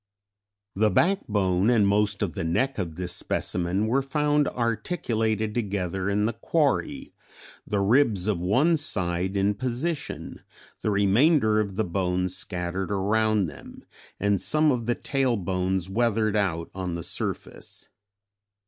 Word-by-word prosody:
The 105 +2 +3
backbone 105 - +2
and 110 -5 +4
most 100 0 +1
of 90 -6 -2
the - - -4
neck 120 +11 0
of 85 -5 -3
this 90 0 -3
specimen 90 +3 -1
were 125 +5 +2
found 150 +1 +1
articulated 115 - -1
together 95 -4 -2
in 105 +1 +1
the 115 - 0
quarry, 125 - -1 0.5
the 100 -1 0
ribs 110 -3 +3
of 105 -5 0
one 130 - +3
side 95 - 0
in 100 +1 +2
position, 130 +7 -4 0.4
the - - 0
remainder 110 - +3
of 100 -3 -2
the 110 - +1
bones 90 0 -1
scattered 90 0 -3
around 105 +1 +1
them, 75 -4 -10 0.4
and 100 -1 +1
some 155 -1 +3
of 120 -3 -2
the 120 - +1
tail 130 -4 0
bones 95 -1 -1
weathered 110 0 +1
out 85 -5 -1
on 90 -2 -4
the 85 - -5
surface. - - -5
105 Hz, 140 wpm, -26 LUFS, 95-120 Hz, 0.5 s, and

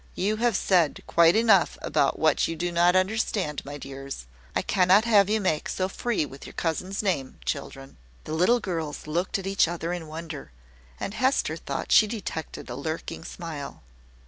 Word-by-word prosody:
"You 210 +4 0
have 235 -1 +2
said 175 -6 +2
quite 170 +1 +5
enough 220 -5 +4
about 135 - +1
what 155 -2 +3
you 165 - -3
do 175 +2 -2
not 175 +1 +4
understand, 185 -5 0
my 145 +1 -7
dears. 135 - -7 0.3
I - - +1
cannot 190 +3 +4
have 205 -4 +5
you 220 +1 +2
make 185 -7 0
so 185 - -1
free 210 -3 -1
with 135 -1 -11
your - - -11
cousin's 185 +5 -2
name, 155 -10 -1
children." 135 0 -5 0.3
The 155 - -6
little 180 +10 +4
girls 165 -8 -4
looked 170 +6 -1
at 195 - -7
each 195 -3 +3
other 170 0 -3
in 170 -3 -5
wonder; 155 - -7 0.5
and - - -4
Hester 260 +4 +1
thought - - -5
she 215 - +7
detected 200 -8 -5
a 120 - -5
lurking 160 +3 -5
smile. 160 - -7
175 Hz, 175 wpm, -26 LUFS, 155-195 Hz, 0.5 s, she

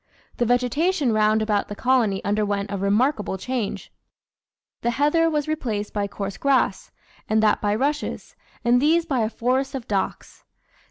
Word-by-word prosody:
The 240 - +1
vegetation 250 +4 +1
round 215 0 +3
about 210 -2 0
the 205 - -6
colony 235 -5 +1
underwent 205 -1 -1
a 200 - -2
remarkable 210 +1 +1
change; 245 +1 -4 0.9
the 235 - 0
heather 295 +6 +2
was 300 -2 -1
replaced 225 -10 -3
by 205 -1 -1
coarse 200 -1 -5
grass, 265 -8 +1 0.4
and 220 0 +2
that 210 -1 +3
by 205 0 +1
rushes, 290 +5 -2 0.3
and 245 +1 +4
these 325 +3 +3
by 270 -6 -1
a 220 -1 +1
forest 260 +4 -1
of 255 -3 -6
docks. 200 -2 -3
235 Hz, 155 wpm, -23 LUFS, 205-275 Hz, 0.9 s, and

